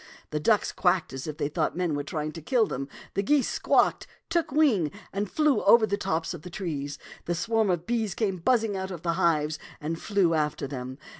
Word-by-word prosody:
The 150 - -1
ducks 210 +7 +2
quacked 180 -5 +1
as 135 +3 -5
if 150 -1 -5
they 145 -2 0
thought 155 +2 -1
men 180 -3 0
were 145 - -1
trying 155 +1 -3
to 165 - -9
kill 235 - +2
them; 135 -7 -4 0.3
the 200 - +1
geese 275 +6 +2
squawked, - - +2 0.2
took 330 -3 +1
wing, 260 - +3 0.2
and 200 0 -2
flew 305 -3 +2
over 230 -2 +7
the 200 -1 0
tops 165 -4 -2
of 170 - -8
the 180 - -9
trees; 150 -7 -4 0.3
and 175 - +1
a - - -2
swarm 225 +3 +1
of 175 -2 0
bees 225 -4 -1
came 195 -5 0
buzz 230 +7 +2
ing 210 -3 -2
out 190 0 -3
of 175 -4 -7
their 170 -1 +1
hives 155 -4 +1 0.2
and 165 +2 -4
flew 195 -5 +2
after 150 -3 0
them. 130 -1 -6
175 Hz, 225 wpm, -27 LUFS, 155-215 Hz, 0.3 s, over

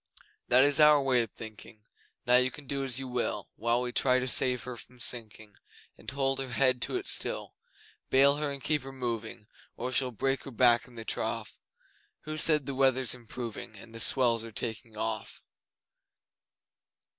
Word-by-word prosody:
That 125 +2 +6
is 145 +1 +4
our 150 -1 +7
way 130 -3 +3
of 115 - -2
thinking, 110 0 -11 0.4
Now 125 0 +6
you 125 0 +4
can 145 +3 -12
do 140 +1 -3
as 130 -2 -2
you 135 0 -5
will, 125 -1 -3
While 115 +3 0
we 125 - -3
try 130 0 +2
to 130 0 -2
save 125 -1 +3
her 125 -1 -6
from 125 +1 -13
sinking, 110 -3 -2 0.4
And - - -9
hold 135 0 0
her 130 -2 -5
head 130 0 +2
to - - 0
it - - -6
still. - - 0 0.6
Bale 140 +2 +5
her 150 -1 -1
and 140 -2 -6
keep 150 +1 +1
her 135 +1 -9
moving, 115 -5 -5 0.3
Or 125 +2 -4
she'll 130 0 +1
break 135 +4 -1
her - - -7
back 120 -1 +4
in 125 - -17
the 115 -1 -8
trough... - - -4 0.6
Who 155 0 -5
said 150 -3 +3
the 140 - -4
weather's 130 -1 +2
improving, 120 -2 -7
And 115 +3 -13
the 115 - -7
swells 120 -1 +2
are 115 - -9
taking 110 0 -5
off? 110 -1 -4
125 Hz, 185 wpm, -29 LUFS, 115-135 Hz, 0.6 s, our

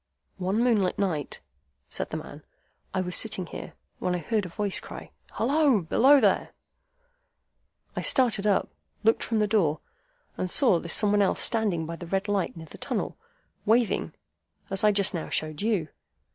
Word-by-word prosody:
"One 195 +5 0
moonlight 215 -7 +2
night," 165 -8 -2 0.5
said - - -5
the - - -4
man, - - -9 0.5
"I 190 - -1
was 180 -1 -1
sitting 200 -5 +2
here, - - -8 0.3
when 180 0 -1
I - - 0
heard 205 +4 -1
a - - -11
voice 205 +2 -1
cry, - - -10 0.2
'Halloa! 270 - +2
Below 270 - +5
there!' 205 -6 +1 1.4
I - - -2
started 230 -6 +2
up, 200 - +2 0.3
looked 225 +1 +3
from 225 - -1
that 210 -1 +1
door, 165 -9 +2 0.6
and 185 - -2
saw 220 - +4
this 170 - +1
Some 210 -1 +2
one 205 0 +3
else 195 - +1
standing 205 -8 +1
by 165 +1 -6
the 175 - -9
red 195 +3 -1
light 200 -4 -1
near 160 - -8
the - - -14
tunnel, - - -3 0.5
waving 230 +1 +1 0.6
as 195 +1 +2
I 210 - +6
just 200 -1 +2
now 170 - -4
showed 155 +1 -2
you. 205 -8 0
200 Hz, 175 wpm, -27 LUFS, 180-220 Hz, 1.4 s, I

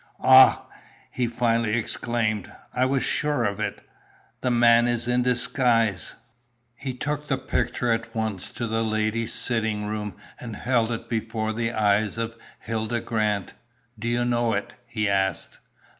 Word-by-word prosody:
"Ah!" 130 0 +7 0.5
he 125 -1 -1
finally 115 -2 +1
exclaimed, 110 -3 -1 0.2
"I 125 +1 +2
was 135 0 +1
sure 150 -5 0
of 100 -1 -1
it! 110 - -4 0.5
The 125 - 0
man 120 0 +5
is 120 0 -1
in 125 0 +2
disguise!" 120 - +1 0.6
He 130 +1 -6
took 150 +3 -3
the 135 - 0
picture 125 -1 -1
at 115 +1 -2
once 110 -4 -2
to 120 - -3
the 115 0 0
ladies' 110 +1 0
sitting 110 -3 0
room, 105 -2 -4 0.2
and 115 -3 -7
held 120 -2 +1
it 115 - -4
before 110 -1 -2
the 115 +1 -1
eyes 105 -2 +1
of 115 0 -3 0.3
Hilda 115 +1 -2
Grant. 105 -4 -1 0.5
"Do 115 - -4
you 120 +1 +1
know 120 -1 +1
it?" 100 - -3
he 110 -2 -1
asked. 95 -2 -1
115 Hz, 150 wpm, -25 LUFS, 110-120 Hz, 0.6 s, Ah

